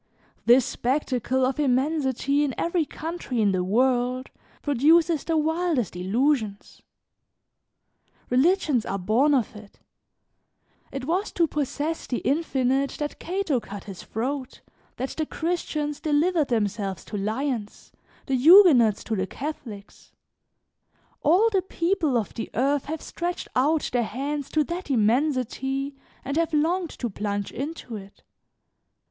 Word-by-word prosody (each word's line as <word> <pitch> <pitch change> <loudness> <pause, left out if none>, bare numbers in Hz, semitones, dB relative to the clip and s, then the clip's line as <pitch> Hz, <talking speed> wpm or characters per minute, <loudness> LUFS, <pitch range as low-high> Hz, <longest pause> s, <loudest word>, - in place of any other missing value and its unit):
This 245 +1 +6
spectacle 260 -1 0
of 265 +2 -1
immensity 280 0 +1
in 275 -4 -1
every 335 -1 0
country 320 -6 -5
in 205 -2 +3
the 185 -1 0
world, 250 +5 +1 0.3
produces 310 +3 +3
the 325 -1 0
wildest 315 - 0
illusions. 215 +3 -1 1.5
Religions 290 - +3
are 195 - -3
born 235 +10 +3
of 240 -4 -1
it; 210 -1 -13 1.1
it 270 -1 -5
was 365 +7 -1
to 340 - +3
possess 300 +1 -3
the 245 - -1
infinite 270 -2 +1
that 295 -1 -4
Cato 350 -7 -1
cut 205 -3 -9
his 195 -3 -9
throat, 260 +4 -4 0.4
that 260 +2 -3
the 315 - -2
Christians 305 -3 -2
delivered 310 +1 +2
themselves 205 -5 -2
to - - -7
lions, 220 +2 -3 0.3
the 270 - -2
Huguenots 260 - +7
to 225 - -2
the 190 -1 -1
Catholics; 235 -8 -8 1.1
all 365 +9 +4
the 390 -3 +2
people 340 -7 0
of 220 - -3
the 225 - -5
earth 275 +3 +1
have 315 +1 -5
stretched 350 +1 -4
out 295 +5 +2
their 245 - +3
hands 275 +5 -3
to 310 - +2
that 345 +3 -5
immensity 270 +3 0 0.3
and 280 +3 -2
have 330 -1 +1
longed 335 +3 +1
to 245 - -2
plunge 205 -1 -3
into 275 -4 -5
it. 195 0 -13
275 Hz, 130 wpm, -25 LUFS, 235-315 Hz, 1.5 s, Huguenots